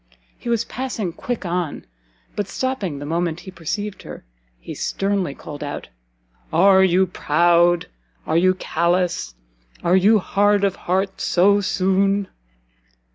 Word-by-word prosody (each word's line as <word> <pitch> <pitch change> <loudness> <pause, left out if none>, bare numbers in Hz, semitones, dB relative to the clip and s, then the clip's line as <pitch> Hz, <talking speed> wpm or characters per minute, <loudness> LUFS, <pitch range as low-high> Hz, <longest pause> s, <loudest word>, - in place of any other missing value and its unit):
He 240 - -7
was 235 -1 +1
passing 235 -8 -4
quick 240 0 -4
on, 175 -3 -3 0.5
but 205 - -2
stopping 200 - -3
the 145 - -7
moment 165 +1 -2
he 190 - -10
perceived 190 +4 -4
her, - - -10 0.3
he - - -8
sternly 195 -7 -1
called 150 -1 -8
out 145 0 -6 0.6
"Are 190 +3 +5
you 190 0 +4
proud? 175 0 +2 0.4
are - - -1
you 185 +2 +4
callous? 170 - -1 0.5
are 175 +2 +3
you 205 +4 +5
hard 205 +1 +2
of 195 -1 +1
heart 190 +2 -2
so 200 +3 +3
soon?" 195 +1 +1
185 Hz, 130 wpm, -21 LUFS, 170-200 Hz, 0.6 s, Are